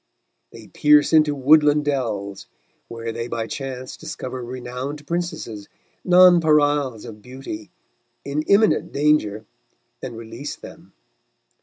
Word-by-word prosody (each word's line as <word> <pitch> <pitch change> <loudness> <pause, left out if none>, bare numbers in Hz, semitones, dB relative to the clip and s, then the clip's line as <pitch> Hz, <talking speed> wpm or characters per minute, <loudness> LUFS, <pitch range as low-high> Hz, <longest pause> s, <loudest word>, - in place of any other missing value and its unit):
They - - -13
pierce 150 +1 +3
into 155 -2 +4
woodland 150 +2 +4
dells, 105 -9 -3 0.4
where 115 0 -6
they 115 +1 -5
by 115 -2 -3
chance 130 0 -6
discover 130 -1 -7
renowned 125 +4 -6
princesses, 160 - -5 0.3
nonpareils 150 - +4
of 105 -2 -11
beauty, 125 -3 -9 0.6
in 140 +2 -2
imminent 210 +2 +3
danger, 140 -8 +1 0.6
and 120 -3 -7
release 115 +5 -7
them. - - -14
135 Hz, 110 wpm, -22 LUFS, 115-150 Hz, 0.6 s, into